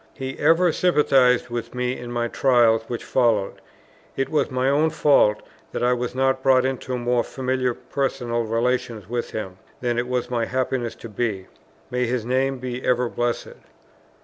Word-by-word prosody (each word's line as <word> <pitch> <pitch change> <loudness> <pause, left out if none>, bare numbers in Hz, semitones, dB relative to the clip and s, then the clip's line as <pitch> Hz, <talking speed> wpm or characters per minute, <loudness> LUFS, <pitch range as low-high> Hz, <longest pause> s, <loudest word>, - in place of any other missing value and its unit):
He 135 -1 -6
ever 165 +3 +4
sympathized 135 -9 +3
with 120 +1 -5
me 125 0 -1
in 120 0 -8
my 120 -1 -1
trials 120 -3 +3
which 120 - -4
followed; 115 -6 +1 0.5
it 135 - -1
was 155 - +1
my 130 -1 0
own 150 +3 +3
fault, 145 -9 +3 0.3
that - - -2
I 125 0 +3
was 125 0 -3
not 130 0 +1
brought 130 -1 +4
into 130 -1 -2
more 120 0 +1
familiar 130 -2 -1
personal 120 -4 -2
relations 115 -2 -1
with 120 +1 -3
him, 95 -4 -6 0.2
than 120 -1 -1
it 120 - -2
was 125 -1 -1
my 120 -2 -1
happiness 130 -1 -2
to 115 - -10
be. 105 -3 -2 0.5
May 125 0 0
his 120 -2 -2
name 130 +2 0
be 125 0 -5
ever 125 -1 +1
blessed! 120 0 -2
125 Hz, 170 wpm, -23 LUFS, 120-130 Hz, 0.5 s, ever